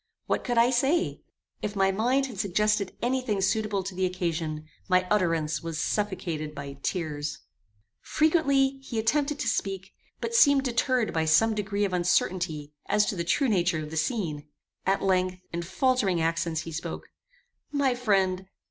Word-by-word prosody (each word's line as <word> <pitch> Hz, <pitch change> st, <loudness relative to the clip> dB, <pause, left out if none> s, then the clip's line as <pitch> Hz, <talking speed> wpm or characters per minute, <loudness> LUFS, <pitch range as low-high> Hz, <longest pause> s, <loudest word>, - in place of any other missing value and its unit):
What -, -, -1 dB
could 240 Hz, -1 st, -1 dB
I 235 Hz, +2 st, +5 dB
say? 270 Hz, +8 st, +1 dB, 0.4 s
If 210 Hz, 0 st, -3 dB
my 195 Hz, -1 st, +3 dB
mind 245 Hz, +7 st, +1 dB
had 240 Hz, -8 st, -8 dB
suggested 205 Hz, +1 st, 0 dB
any 260 Hz, +2 st, +1 dB
thing 210 Hz, -5 st, -1 dB
suitable 200 Hz, 0 st, 0 dB
to 190 Hz, +1 st, -5 dB
the 185 Hz, 0 st, 0 dB
occasion, 165 Hz, -4 st, -3 dB, 0.2 s
my 185 Hz, 0 st, +3 dB
utterance 165 Hz, -6 st, +1 dB
was 165 Hz, -1 st, -5 dB
suffocated 165 Hz, -6 st, -2 dB
by 140 Hz, -1 st, -7 dB
tears. 155 Hz, -4 st, -3 dB, 0.6 s
Frequently 280 Hz, -4 st, +2 dB
he 255 Hz, -4 st, -6 dB
attempted 280 Hz, +6 st, +1 dB
to 295 Hz, -, -3 dB
speak, 195 Hz, -1 st, -2 dB, 0.3 s
but 465 Hz, -, -4 dB
seemed 285 Hz, -, +6 dB
deterred 250 Hz, -1 st, +1 dB
by 160 Hz, -1 st, +1 dB
some 220 Hz, +9 st, +4 dB
degree 205 Hz, -1 st, -1 dB
of 190 Hz, -, -3 dB
uncertainty 175 Hz, -4 st, 0 dB
as 210 Hz, 0 st, +3 dB
to 205 Hz, -, -2 dB
the 170 Hz, -, -2 dB
true 265 Hz, -, +1 dB
nature 175 Hz, -7 st, +1 dB
of 150 Hz, -, -8 dB
the -, -, -5 dB
scene. 155 Hz, -, -2 dB, 0.4 s
At 195 Hz, +1 st, +2 dB
length, 185 Hz, -1 st, +2 dB, 0.2 s
in 170 Hz, -, -2 dB
faltering 200 Hz, -1 st, +1 dB
accents 165 Hz, 0 st, 0 dB
he 165 Hz, -, -7 dB
spoke: 165 Hz, +1 st, -5 dB, 0.6 s
"My 280 Hz, -3 st, +2 dB
friend! 190 Hz, -6 st, +1 dB
195 Hz, 165 wpm, -27 LUFS, 165-240 Hz, 0.6 s, seemed